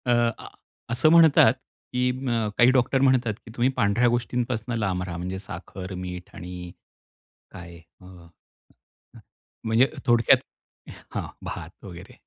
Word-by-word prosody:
अ, 125 - +1 0.3
आ, - - -11 0.4
असं 120 +6 +3
म्हणतात, 160 -8 +6 0.4
की 125 0 +1 0.2
अ, 115 -3 0
काही 120 +1 +6
डॉक्टर 130 +1 +2
म्हणतात, 130 -4 +3
की 115 - -11
"तुम्ही 120 +2 +2
पांढऱ्या 115 +1 +3
गोष्टींपासून 120 -1 -2
लांब 95 -4 -1
राहा." 90 -2 -6
म्हणजे 90 +2 -4
साखर, 95 0 -8
मीठ 90 -1 -7
आणि 90 0 -8 0.8
काय 85 0 -11 0.3
अ, - - -15
अ, 85 -3 -17 1.2
म्हणजे 115 +4 +3 0.2
थोडक्यात 120 -3 +5 0.8
हां, - - -3 0.2
भात - - -8
वगैरे. - - -11
110 Hz, 130 wpm, -25 LUFS, 90-125 Hz, 1.2 s, म्हणतात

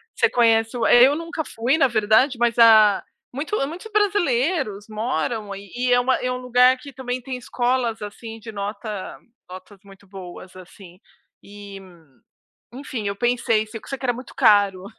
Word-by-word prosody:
você - - +2
conhece 225 0 +2
o 230 - -1
eh, 245 0 +6
eu 285 - 0
nunca 330 0 -5
fui 255 +3 -1
na 275 - +4
verdade, 230 +3 +2
mas 240 0 0
a 215 -3 +6 0.3
muito 295 +10 -4
muitos 365 +8 -9
brasileiros 290 - 0
moram, 215 -2 -3
e 240 +6 -4
é 245 - +5
uma 255 +1 +1
é 250 0 -3
um 250 - -3
lugar 250 +1 +3
que 275 +2 -12
também 250 0 -5
tem 255 +1 -6
escolas, 245 -2 -2
assim, 225 +2 -9
de 225 +1 -10
nota 205 0 -6 0.3
notas 185 +2 -12
muito 195 0 -18
boas, 185 -1 -11
assim. 185 0 -15 0.4
E 200 -1 -11 0.9
enfim, 250 -5 -6
eu 200 - -3
pensei, 235 -1 0
só 225 +5 -8
que - - -15
era 245 - +1
muito 250 +2 -11
caro, 200 -3 +3
230 Hz, 165 wpm, -22 LUFS, 205-255 Hz, 0.9 s, eh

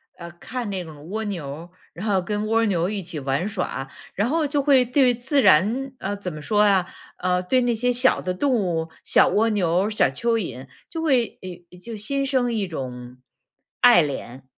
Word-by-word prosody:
呃， 170 0 -9
看 235 +5 -6
那 190 -2 -3
种 155 +1 -12
蜗 220 +2 -3
牛， 165 -5 -6 0.3
然 190 +5 -7
后 195 -3 +2
跟 210 +3 -3
蜗 225 +1 +2
牛 180 -4 0
一 205 -1 -3
起 165 -3 -6
玩 140 +7 -1
耍。 180 -9 -4 0.2
然 210 +5 0
后 320 0 +1
就 285 0 0
会 270 -3 +4
对 250 0 +3
自 265 +4 +1
然 220 - +3
呃， 200 +1 -4
怎 190 -3 -6
么 155 - -8
说 210 +7 +1
啊 195 -3 +3 0.3
呃， 180 0 0
对 255 +8 +1
那 245 -1 +1
些 245 +3 +1
小 250 +2 +4
的 185 - -2
动 260 +9 0
物， 170 -7 -1
小 - - +4
蜗 225 +2 +2
牛、 185 -1 +1
小 215 - +2
蚯 230 - 0
蚓 130 - -5 0.2
就 325 - -5
会 260 -7 +1 0.3
有 180 - -14
就 225 +4 -8
心 275 +7 0
生 255 -3 0
一 205 -4 -1
种 125 -5 -7 0.6
爱 240 -9 +7
怜。 135 -3 -6
205 Hz, 210 characters per minute, -23 LUFS, 170-245 Hz, 0.6 s, 爱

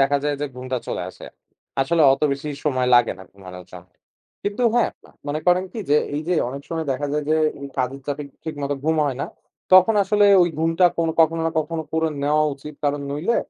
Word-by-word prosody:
দেখা 140 +1 +3
যায় 145 -1 0
যে 145 - -1
ঘুমটা 130 0 -3
চলে - - -3
আসে। - - -12 0.5
আসলে 160 +5 +2
অত 135 - -2
বেশি 140 +2 -5 0.2
সময় 130 -4 +1
লাগে 120 -1 +4
না - - -10
ঘুমানোর 90 -2 -11
জন্য। 90 0 -11 0.6
কিন্তু 205 +4 -2
হ্যাঁ, 240 - +3 0.2
আ - - -17 0.2
মনে 150 +2 -2
করেন 180 +1 +4
কি? 230 - -6
যে 150 - +6 0.2
এইযে 160 +4 -1
অনেক 140 +2 -7
সময় 160 -1 -3
দেখা 145 +3 -3
যায় 150 0 -1
যে 155 - +4 0.3
এই 140 - -6
কাজের 130 +2 -2
চাপে 145 0 -3 0.2
ঠিকমতো 145 -3 -3
ঘুম 160 0 +2
হয় 135 -3 -2
না, - - -2 0.5
তখন 185 +4 +7
আসলে 205 +1 +3 0.2
ওই 175 - +2
ঘুমটা 165 +3 +2
কোন 165 - +1
কখনো 165 +1 +3
না - - 0
কখনো 160 +1 -2
করে 160 0 +1
নেওয়া 150 +2 +2
উচিত। 150 +2 -10
কারণ 145 0 0
নইলে, 160 +12 0
150 Hz, 210 wpm, -22 LUFS, 140-165 Hz, 0.6 s, তখন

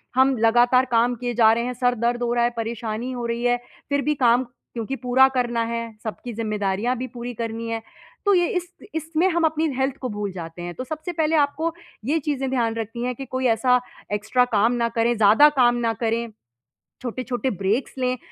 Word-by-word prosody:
हम 260 0 +4
लगातार 240 +3 +4
काम 240 +1 +3
किए 245 +1 -3
जा 225 -2 +5
रहे 235 +1 0
हैं, 250 - -2
सर 245 0 +1
दर्द 240 0 +1
हो 240 - 0
रहा 240 0 +2
है, 240 - +3
परेशानी 230 +1 -3
हो 245 -1 -4
रही 235 0 -2
है, 245 0 +3 0.3
फिर 285 0 +1
भी 300 +1 0
काम 240 +1 +5 0.3
क्योंकि 235 +3 -3
पूरा 260 +2 +6
करना 240 -1 0
है, 230 - -2 0.2
सबकी 230 +2 -6
ज़िम्मेदारियाँ 215 +1 -1
भी 255 - -4
पूरी 240 +1 -5
करनी 230 0 -4
है। 225 0 -2 0.4
तो 405 - +5
ये 350 -2 +4
इस 355 0 -4 0.3
इसमें 320 +2 +1
हम 340 -1 0
अपनी 320 0 +1
हेल्थ 265 0 0
को 255 - -2
भूल 205 -1 -2
जाते 170 -1 -8
हैं। 175 0 -5
तो 255 - -4
सबसे 315 +6 -5
पहले 320 -1 +1
आपको 310 +3 +1 0.3
ये 305 +6 +1
चीज़ें 275 -3 -2
ध्यान 235 -3 0
रखनी 230 +1 -4
है 250 0 -1
कि 270 +3 -7
कोई 260 0 -3
ऐसा 250 +2 +4 0.3
एक्स्ट्रा 220 +5 +2
काम 230 -1 +2
ना 235 -1 0
करें, 235 +1 +1
ज़्यादा 220 +8 +7
काम 245 -4 +3
ना 225 - +1
करें। 230 0 -1 0.7
छोटे-छोटे 250 0 -2
ब्रेक्स 200 +8 0
लें 255 0 0
245 Hz, 205 wpm, -23 LUFS, 230-265 Hz, 0.7 s, ज़्यादा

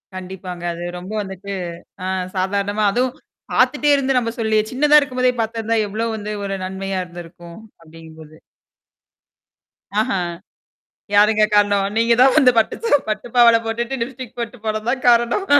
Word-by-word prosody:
கண்டிப்பாங்க. 185 -1 -7
அது 170 +1 -7 0.2
ரொம்ப 185 +3 -9
வந்துட்டு 195 0 -7 0.5
ஆ - - -3 0.3
சாதாரணமா 200 +3 0
அதுவும் 250 +3 0 0.4
பாத்துட்டே 295 0 +2
இருந்து 270 -1 +1
நாம் 230 -1 -3
சொல்லி 220 -1 +2
சின்னதா 295 +3 +5
இருக்கும்போதே 255 -3 0
பார்த்திருந்தா 225 0 -1
எவ்வளவு 225 +2 -2
வந்து 210 0 -5
ஒரு 195 0 -3
நன்மையா 190 0 -4
இருந்திருக்கும் 170 -1 -11 0.2
அப்படிங்கும்போது. 160 -1 -14 1.7
ஆஹா. 205 - -1 1.0
யாருங்க 210 +1 +5
காரணம்? 205 -1 +3
"நீ 225 - +4 0.2
தான் 265 0 +5
வந்து 270 -5 +6
பட்டுச் 225 - 0
சட்ட 290 - +5
பட்டுப் 215 +3 -4
பாவாடை 235 -1 +7
போட்டுட்டு, 235 +4 -3
லிப்ஸ்டிக் 250 0 -7
போட்டுப் 235 -1 -6
போனது 215 +1 -2
தான் 260 0 -3
காரணம்." 240 - +3
215 Hz, 140 wpm, -20 LUFS, 190-245 Hz, 1.7 s, பாவாடை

